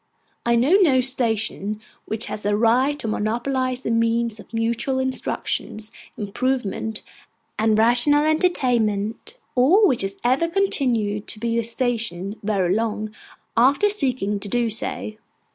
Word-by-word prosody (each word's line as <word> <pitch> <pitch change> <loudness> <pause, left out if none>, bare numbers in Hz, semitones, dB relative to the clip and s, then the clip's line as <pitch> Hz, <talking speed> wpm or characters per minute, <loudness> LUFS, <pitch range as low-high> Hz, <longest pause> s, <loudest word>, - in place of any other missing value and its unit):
I 235 - +4
know 270 +11 +4
no 275 -8 +4
station 225 -5 0 0.3
which 220 +1 -4
has 210 - -6
a 205 0 +1
right 250 +6 +2
to 230 - -6
monopolise 250 +4 -1
the 230 - -3
means 230 -1 0
of - - -14
mutual 235 +3 -1
instruction, 260 -4 -2 0.4
improvement, 220 0 -2 0.6
and 220 0 +2
rational 245 +6 +4
entertainment; 245 - 0 0.2
or 325 - +5
which 255 - +1
has 195 0 -4
ever 260 +7 +2
continued 240 - 0
to 215 - -4
be 235 +1 -1
a - - -1
station 230 -5 -2
very 195 -4 0
long, 215 0 -2 0.4
after 275 - +4
seeking 255 - -1
to 200 0 -6
do 235 +1 0
so. 215 0 0
235 Hz, 135 wpm, -22 LUFS, 215-260 Hz, 0.6 s, or